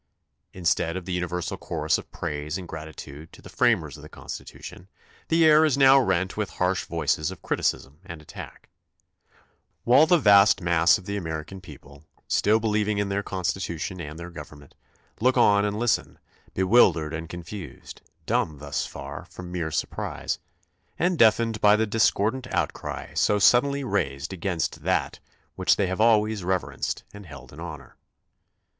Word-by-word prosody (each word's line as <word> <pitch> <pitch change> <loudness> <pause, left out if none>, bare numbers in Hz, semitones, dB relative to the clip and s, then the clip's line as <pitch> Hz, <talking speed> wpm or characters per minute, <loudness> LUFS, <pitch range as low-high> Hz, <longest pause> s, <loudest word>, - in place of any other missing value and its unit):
Instead 85 -1 0
of 90 - -7
the 95 - -4
universal 90 -1 -3
chorus - - -1
of - - -12
praise 75 +3 -4
and 90 -2 -8
gratitude 80 -1 -9
to - - -15
the - - -13
framers - - +1
of - - -13
the - - -12
Constitution 90 - -10 0.4
the 165 0 +3
air 155 0 +6
is 150 -4 +2
now 135 0 +7
rent 95 -5 0
with 105 -1 -2
harsh 90 0 0
voices 75 -1 -1
of 95 - -10
criticism 70 +3 -2
and 85 -5 -9
attack; 75 - -11 1.1
while 135 +6 +5
the 175 - +5
vast 100 -7 +6
mass 85 0 +3
of 95 - -14
the 100 - -4
American 80 +1 -6
people, 70 -3 -14 0.2
still 110 +2 +2
believing 105 -1 0
in 100 -1 -1
their 100 +1 -1
Constitution 90 -2 -3
and 75 0 -8
their 85 +1 -8
government, 75 -2 -12 0.5
look 130 +3 +2
on 105 -4 +4
and 105 0 -2
listen, 120 +1 0 0.4
bewildered 90 -6 +3
and 80 +1 -5
confused, 90 +3 -9 0.2
dumb 75 -2 0
thus 70 +1 -3
far - - -8
from 90 -1 -9
mere 85 -3 -2
surprise, - - -3 0.6
and 180 +1 +1
deafened 115 -3 +3
by 105 0 +6
the 110 +1 +1
discordant 115 +3 +1
outcry - - -3
so 105 - +2
suddenly 140 +7 +4
raised 75 - -2
against 90 -2 -3
that - - -1 0.4
which - - +3
they 100 - +1
have 95 +3 -2
always 110 -3 +3
reverenced 95 0 -2
and 100 -3 -11
held 70 -3 -12
in 75 - -12
honor. 80 -6 -9
95 Hz, 160 wpm, -25 LUFS, 80-105 Hz, 1.1 s, now